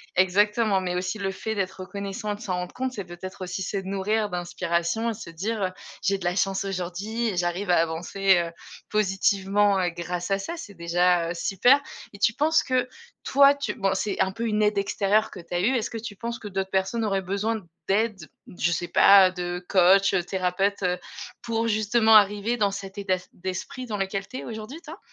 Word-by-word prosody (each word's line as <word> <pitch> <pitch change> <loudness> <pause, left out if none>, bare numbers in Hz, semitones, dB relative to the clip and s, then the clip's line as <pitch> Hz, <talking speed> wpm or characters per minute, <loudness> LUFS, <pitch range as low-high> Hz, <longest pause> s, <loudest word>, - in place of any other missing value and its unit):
exactement 205 +2 +3
mais 180 -1 -2
aussi 185 +4 -2
le 195 -1 -1
fait 220 +3 -4
d'être 190 -2 -3
reconnaissant 200 +3 -5
et - - -2
de - - -14
s'en 195 -5 -4
rendre 180 0 -5
compte 260 0 -3
c'est 200 -5 -5
peut-être 185 +2 -8
aussi 185 +1 -4
se 195 - -3
nourrir 200 +2 -1
d'inspiration 175 +4 -1
et - - -1
se 205 -5 -9
dire: 200 +5 -3
«Heu, 185 - +1 0.3
j'ai 195 +1 +1
de 190 - -10
la 175 0 0
chance 195 0 +1
aujourd'hui 195 +5 -3
et 205 - -2
j'arrive 175 +2 -1
à - - +5
avancer, 175 +4 +1
heu, 170 - -7 0.4
positivement, 200 0 +2
heu, 180 - +1
grâce 175 +2 -4
à 195 - +2
ça», 195 - -5
c'est 205 - -9
déjà, 170 0 +2
heu, - - -2
super. 220 +10 +3 0.3
Et 200 - -12
tu 220 - +4
penses 305 +5 +2
que 255 -2 0 0.4
toi 280 +1 +6
tu 280 - -3
bon 195 -3 0
c'est 195 0 -1
un 190 - +2
peu 230 +4 -4
une 215 -1 +1
aide 210 -1 +2
extérieure 200 +2 +1
que - - -9
tu 170 - -11
as 175 - +1
eue, 245 +8 +2
est-ce 230 -1 -1
que 230 - -6
tu 220 -2 -7
penses 235 +3 -5
que 215 - -8
d'autres 190 -1 -3
personnes 190 +5 0
auraient 195 -3 0
besoin 210 +4 -1 0.3
d'aide, 200 -4 0 0.3
je 175 - +1
sais 175 +1 -2
pas, 195 0 +7
de 180 0 -4
coach, 195 +1 +5
heu, 180 -2 +2
thérapeute, 190 +2 -1
heu, 180 0 +1 0.4
pour 230 0 -1
justement 220 +1 +3
arriver 210 +2 +4
dans 205 -3 +2
cet 195 0 -7
état 195 -2 +1
s 180 - -11
d'esprit 190 +8 -5
dans 210 -2 -3
lequel 195 0 -3
tu 255 - -7
es - - -6
aujourd'hui, 225 +6 -7
toi? 320 +4 -10
195 Hz, 215 wpm, -25 LUFS, 185-215 Hz, 0.4 s, pas